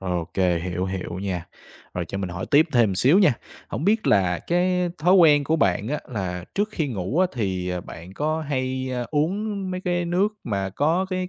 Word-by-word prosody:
OK, 90 -3 -3 0.3
hiểu, 90 0 -2
hiểu 95 -1 -4
nha. 90 -3 -3 0.5
Rồi 90 - -2
cho 100 - -4
mình 95 -2 -3
hỏi 90 +2 -5
tiếp 150 +3 +6
thêm 120 -4 +4
một - - -2
xíu 140 - +5
nha. 185 -9 +5 0.4
Hổng 155 - -4
biết 220 +2 +2
là 90 -4 +3
cái 180 +1 +1
thói 180 +4 +4
quen 150 -6 +6
của 160 +3 +1
bạn 100 - +1
á, 150 +2 -2
là 90 -6 -4
trước 205 +2 +1
khi 155 -7 -1
ngủ 110 - -2
á, 185 - +5
thì, 95 -7 -2
à, 90 -1 -2
bạn 85 +2 -11
có 155 +4 -1
hay, 130 -2 -2
a, 125 -1 -2
uống 195 +6 -1
mấy 185 0 -3
cái 175 -1 -1
nước 180 +4 +2 0.2
mà 100 -4 -2
có 160 - +1
cái 185 0 -2
130 Hz, 215 wpm, -24 LUFS, -, 0.5 s, tiếp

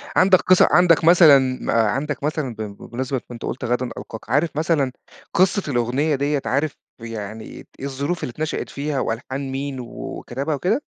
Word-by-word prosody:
عندك 185 0 +5
قصّة 185 -1 +5
عندك 170 +1 +5
مثلًا 165 -4 +8 0.2
ما - - -1
عندك 135 +7 0
مثلًا 150 -5 -2
ب 110 - -7
ب 100 -2 -6
بمناسبة 130 +2 -2
كُنت 120 -1 -7
قُلت 125 - -4
غدًا 125 +1 -1
ألقاك، 110 - -9
عارف 150 +5 +2
مثلًا 155 -4 +1 0.4
قصّة 185 -2 +2
الأغنية 130 +5 +1
ديّة، 140 +1 0
عارف 140 +3 0 0.2
يعني 110 -1 -6
إيه - - -11 0.2
الظروف 140 +5 -3
اللي - - -3
اتنشأت 155 +5 -3
فيها 145 0 -3
وألحان 130 +4 -3
مين 135 0 -4
و 125 - -6 0.3
وكتبها 140 +5 -3
وكده؟ 205 - 0
140 Hz, 170 wpm, -22 LUFS, 125-155 Hz, 0.4 s, مثلًا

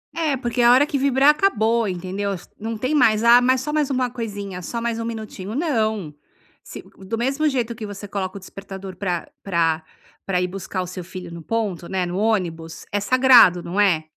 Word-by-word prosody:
É 315 -4 0
porque 245 0 -1
na 240 - +7
hora 285 +3 +5
que 285 - -1
vibrar 275 +1 +4
acabou, 235 - +2
entendeu? 190 +2 -3 0.3
Não 225 +1 -4
tem 260 +7 -1
mais. 225 -5 +4
Ah, 240 +1 +7
mas 255 0 +2
só 300 +2 -4
mais 300 -2 0
uma 255 -2 0
coisinha, 205 -6 -6
só 230 +6 -4
mais 230 -1 -2
um 230 - -3
minutinho. 215 -3 -6
Não. 220 - -1 0.5
Se - - -9 0.2
do 195 +4 -5
mesmo 275 +6 0
jeito 245 -5 -1
que 220 -1 -6
você 205 0 -8
coloca 195 -1 -4
o - - -7
despertador 195 0 -9
pra 180 -4 -3
pra 165 -4 0 0.4
pra 180 -2 0
ir 180 - 0
buscar 190 0 -5
o 180 - -5
seu 180 0 -7
filho 180 -1 -9
no 170 - -8
ponto, 195 -2 -3
né, 190 -2 -1
no 175 - -5
ônibus, 175 -7 -2
é 205 - 0
sagrado, 245 -6 +6
não 185 +4 -3
é. 175 -6 +3
215 Hz, 205 wpm, -22 LUFS, 185-245 Hz, 0.5 s, na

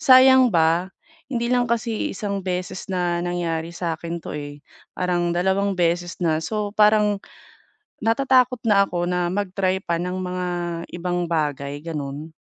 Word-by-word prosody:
sayang 260 -3 +7
ba. 165 +2 +3 0.4
Hindi 235 -1 -1
lang 245 -1 +3
kasi 230 -1 -1
isang 200 0 -3
beses 180 +1 -4
na 175 -1 0
nangyari 170 -2 -2
sa'kin 170 0 -4
'to, - - -6
eh. 145 0 -7 0.4
Parang 175 -1 0
2 190 +3 +1
beses 175 0 0
na. 160 -2 +2
So, 210 +3 -2
parang 210 -1 +4 0.8
natatakot 250 +1 +3
na 200 -1 +5
ako 175 0 -2
na 180 -1 0
mag-try 190 -1 0
pa 170 - 0
ng 180 +1 -3
mga 180 0 -3 0.5
ibang 175 0 -2
bagay, 145 -3 -1
gano'n. 150 -1 -5
180 Hz, 140 wpm, -23 LUFS, 170-210 Hz, 0.8 s, sayang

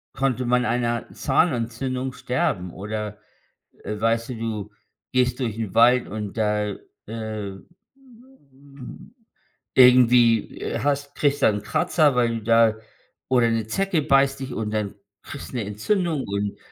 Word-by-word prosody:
konnte 130 -2 0
man 125 +1 +2
einer 120 -1 -1
Zahnentzündung 130 -2 -1
sterben, 95 -9 -2
oder, 105 +3 -5 0.7
äh, 105 +1 -5
weißt 115 +2 0
du, - - -3
du 110 -2 -4 0.4
gehst 125 0 +1
durch 115 -5 -2
'n 110 -3 -4
Wald 120 +2 +5
und 105 -1 -6
da, 105 -2 0 0.3
äh, 110 -2 -5 0.5
m 220 - -15 0.6
irgendwie, 125 -3 +5
äh, - - -3
hast 140 0 -1
kriegst 145 -1 0
da - - +6
'n 105 -1 -3
Kratzer, 155 -1 +2
weil 120 -2 +2
du - - -10
da 115 0 +4 0.5
oder 125 -2 +3
'ne 115 -1 -1
Zecke 195 - 0
beißt 135 -1 +3
dich. 135 -1 -5
Und 110 -1 -3
dann 105 -2 -2 0.3
kriegst 140 - -9
'ne 120 -4 -2
Entzündung 155 - -1
und 100 0 -3
120 Hz, 140 wpm, -23 LUFS, 110-135 Hz, 0.7 s, da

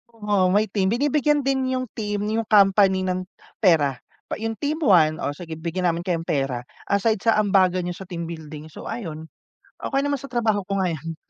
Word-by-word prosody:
Oo, 205 -4 +1
may 210 +1 +4
team. 190 -2 +1
Binibigyan 290 +4 +2
din 265 -1 0
'yung 255 0 -1
team, 205 -2 -3
'yung 225 -1 -1
company 195 -2 +5
ng 185 0 -2 0.3
pera. 150 - +3 0.3
Pa - - -3
'yung 225 0 -2
team 300 +6 -2
one 165 - +4
o 145 +1 -3
sige 160 -2 -8
bigyan 175 +2 -1
namin 165 - -4
kayong 170 -3 -1
pera. 135 -4 -1 0.2
Aside 200 +2 +1
sa 225 - +5
ambagan 185 -3 +3
niyo 175 0 -4
sa 190 - -9
team 170 -3 -5
building, 155 -2 -8
so - - -9
ayun. 160 -8 -6 0.5
Okey 275 0 0
naman 285 -2 -1
sa 275 - -9
trabaho 220 -4 +1
ko 195 - 0
ngayon. 165 -3 -2
190 Hz, 190 wpm, -23 LUFS, 165-225 Hz, 0.5 s, company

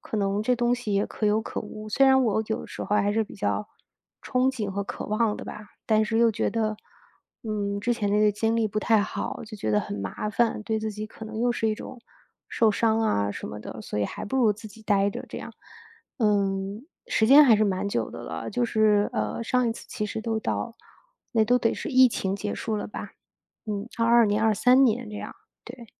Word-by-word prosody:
可 - - -5
能 200 0 0
这 250 +2 +2
东 240 0 +2
西 235 -5 -3
也 200 +1 +2
可 215 - -3
有 215 +1 +2
可 - - -5
无， 215 0 -8
虽 270 +5 +4
然 265 -1 +5
我 220 0 +1
有 220 - -2
的 - - -9
时 - - -7
候 210 - 0
还 205 +1 +2
是 225 - +2
比 215 - -10
较 210 +1 -2 0.5
憧 255 +1 +1
憬 215 -7 -4
和 200 +1 -2
渴 - - -6
望 215 0 +1
的 - - -8
吧。 - - -7 0.3
但 220 -1 +4
是 225 +1 -1
又 230 -1 +4
觉 - - 0
得， 215 -2 -1 0.7
嗯， 205 -2 -2
之 240 +4 0
前 205 -3 -1
那 210 - +3
个 210 -1 +4
经 225 +2 0
历 225 - +2
不 215 0 -2
太 220 -1 +3
好， - - -4
就 215 - -10
觉 110 - -2
得 105 - +3
很 100 - -4
麻 100 - -4
烦， 230 0 +1
对 220 +1 -1
自 220 0 -2
己 210 +1 -6
可 220 - -11
能 220 0 -6
又 240 +1 +2
是 225 -2 0
一 215 - +1
种 250 - -9 0.5
受 225 -3 +3
伤 225 +1 +2
啊 100 - +1
什 - - -6
么 105 - -7
的， 110 0 -8
所 105 - -6
以 105 - +1
还 - - -5
不 265 - -3
如 225 -5 +4
自 215 +2 -11
己 215 +1 -14
呆 200 -2 +2
着 - - -6
这 - - -6
样。 - - -8 0.7
嗯， 200 +1 0 0.2
时 230 - +2
间 290 +3 +9
还 245 -5 +7
是 215 - +2
蛮 195 0 -1
久 115 - -2
的 - - -8
了， 80 0 -5
就 240 +3 0
是， 215 -2 +3
呃， 105 - -2
上 250 0 +1
一 - - 0
次 - - -11
其 245 -4 -3
实 220 - -4
都 220 -1 -2
到 230 +1 -3 0.6
那 225 -3 +4
都 245 +3 +3
得 230 - +1
是 - - -5
疫 260 -1 +7
情 195 -3 -2
结 205 +1 -3
束 220 -2 -3
了 - - -4
吧， - - -7 0.6
嗯， 205 +1 -3
22 230 0 +5
年、 205 +2 +1
23 245 +5 +4
年 235 -1 +1
这 210 - -8
样， - - -7 0.3
对。 240 -1 -10
215 Hz, 255 characters per minute, -26 LUFS, 205-230 Hz, 0.7 s, 间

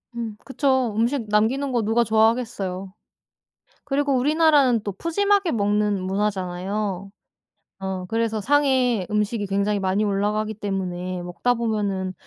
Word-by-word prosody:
음 230 -3 -4
그쵸. 260 -4 +1
음식 235 +1 0
남기는 240 +7 +1
거 240 -3 +1
누가 225 +3 +2
좋아하겠어요? 220 -4 0 0.9
그리고 285 -1 0
우리나라는 290 -3 +4
또 205 - -4
푸짐하게 395 - +1
먹는 205 -2 +1
문화잖아요. 195 0 -2 0.7
어 190 -1 -4
그래서 225 +2 -1
상에 255 -5 +2
음식이 210 0 -1
굉장히 200 +1 0
많이 190 +2 0
올라가기 210 +2 0
때문에 185 -3 -4
먹다 180 +8 0
보면은 205 -5 -2
215 Hz, 310 characters per minute, -23 LUFS, 195-245 Hz, 0.9 s, 우리나라는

